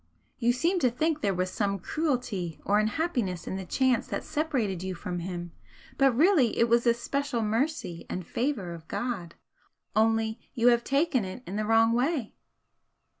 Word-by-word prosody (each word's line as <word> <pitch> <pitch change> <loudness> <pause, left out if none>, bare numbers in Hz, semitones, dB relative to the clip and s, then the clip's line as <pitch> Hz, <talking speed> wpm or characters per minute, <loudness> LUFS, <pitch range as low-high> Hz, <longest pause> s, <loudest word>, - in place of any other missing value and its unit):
You 240 +1 +3
seem 335 +9 +1
to 255 - +3
think 310 +5 0
there 200 - +2
was 185 +1 -1
some 200 0 0
cruelty 235 - -2
or 205 +1 +3
unhappiness 215 - -1
in - - -4
the 190 -1 -5
chance 260 -3 +2
that - - -3
separated 260 - -1
you 190 0 -4
from 175 +1 -4
him, 175 -1 -5 0.5
but 270 -3 +4
really 310 - +4
it 235 - +4
was 235 +1 +3
a 235 - +6
special 250 0 -2
mercy 220 - -1
and 180 -1 -4
favour 230 - -2
of 165 -1 -11
God 200 -9 -4 0.6
only 225 +1 +2 0.2
you 240 -1 +5
have 235 -1 +3
taken 275 -3 +1
it 190 +7 -7
in 195 - -6
the 215 0 -1
wrong 225 +1 +4
way." 255 -1 0
230 Hz, 175 wpm, -28 LUFS, 190-270 Hz, 0.6 s, a